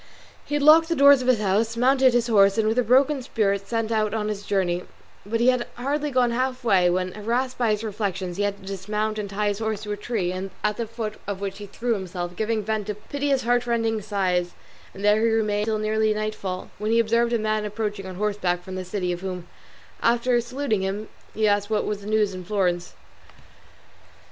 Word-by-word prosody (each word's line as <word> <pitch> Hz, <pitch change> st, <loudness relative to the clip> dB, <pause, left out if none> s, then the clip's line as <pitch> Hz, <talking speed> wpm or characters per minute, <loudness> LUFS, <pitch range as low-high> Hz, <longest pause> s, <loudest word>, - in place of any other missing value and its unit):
He 295 Hz, -, -2 dB
locked 310 Hz, +3 st, +6 dB
the 335 Hz, -, +1 dB
doors 280 Hz, -2 st, +7 dB
of 250 Hz, -, -4 dB
his 255 Hz, -4 st, +4 dB
house, 215 Hz, +3 st, 0 dB
mounted 260 Hz, +1 st, +4 dB
his 240 Hz, -1 st, +3 dB
horse, 200 Hz, -3 st, +4 dB
and 220 Hz, -1 st, +2 dB
with 225 Hz, +3 st, +2 dB
a -, -, +3 dB
broken 265 Hz, +4 st, +3 dB
spirit 200 Hz, -5 st, -1 dB
set 225 Hz, -1 st, -1 dB
out 215 Hz, -1 st, +1 dB
on 215 Hz, -1 st, -1 dB
his 205 Hz, -1 st, -3 dB
journey; 180 Hz, -3 st, 0 dB, 0.4 s
but 230 Hz, +2 st, -1 dB
he 240 Hz, +2 st, +5 dB
had 250 Hz, -1 st, +1 dB
hardly 285 Hz, +4 st, -1 dB
gone 250 Hz, -3 st, +2 dB
half 255 Hz, +1 st, -1 dB
way 190 Hz, -6 st, +4 dB
when, 185 Hz, +1 st, 0 dB
harassed 240 Hz, +6 st, -2 dB
by 235 Hz, -2 st, +2 dB
his 210 Hz, 0 st, 0 dB
reflections, 195 Hz, -4 st, -3 dB
he -, -, -1 dB
had 205 Hz, -1 st, 0 dB
to -, -, -13 dB
dismount 210 Hz, +3 st, -3 dB
and 205 Hz, -1 st, -4 dB
tie 205 Hz, +1 st, 0 dB
his 205 Hz, 0 st, -3 dB
horse 220 Hz, -1 st, -2 dB
to 210 Hz, -, -5 dB
a 205 Hz, -, -2 dB
tree, 205 Hz, -4 st, -2 dB, 0.3 s
at 210 Hz, 0 st, 0 dB
the 235 Hz, -, -3 dB
foot 225 Hz, -1 st, -6 dB
of 200 Hz, -2 st, -3 dB
which 195 Hz, 0 st, -5 dB
he 205 Hz, -, -8 dB
threw 235 Hz, +4 st, -2 dB
himself, 180 Hz, -3 st, -5 dB
giving 220 Hz, +1 st, -1 dB
vent 215 Hz, -1 st, -2 dB
to 210 Hz, -, -3 dB
piteous 275 Hz, +5 st, -1 dB
heartrending 235 Hz, -2 st, +1 dB
sighs; 185 Hz, -4 st, -1 dB, 0.4 s
and 200 Hz, +1 st, -5 dB
there 210 Hz, +1 st, +4 dB
he 230 Hz, -, +4 dB
remained 210 Hz, -2 st, +1 dB
till 220 Hz, -1 st, 0 dB
nearly 215 Hz, 0 st, +1 dB
nightfall, 210 Hz, -4 st, -4 dB
when 210 Hz, +1 st, -2 dB
he 230 Hz, -, +3 dB
observed 230 Hz, +1 st, +2 dB
a 235 Hz, -, +2 dB
man 215 Hz, -1 st, -1 dB
approaching 210 Hz, -2 st, -4 dB
on 185 Hz, -, -7 dB
horseback 185 Hz, -3 st, -1 dB
from 190 Hz, -, -8 dB
the 185 Hz, 0 st, -4 dB
city, 185 Hz, -1 st, -2 dB
of 175 Hz, 0 st, -4 dB
whom, 180 Hz, -2 st, -5 dB, 0.5 s
after 240 Hz, +1 st, +2 dB
saluting 240 Hz, -3 st, -2 dB
him, 200 Hz, +3 st, -3 dB, 0.3 s
he 220 Hz, 0 st, +2 dB
asked 205 Hz, 0 st, +1 dB
what 215 Hz, -1 st, 0 dB
was 205 Hz, -1 st, -3 dB
the 200 Hz, -, -9 dB
news 215 Hz, -2 st, +1 dB
in 185 Hz, 0 st, -7 dB
Florence. 180 Hz, -2 st, -1 dB
215 Hz, 215 wpm, -24 LUFS, 195-235 Hz, 0.5 s, doors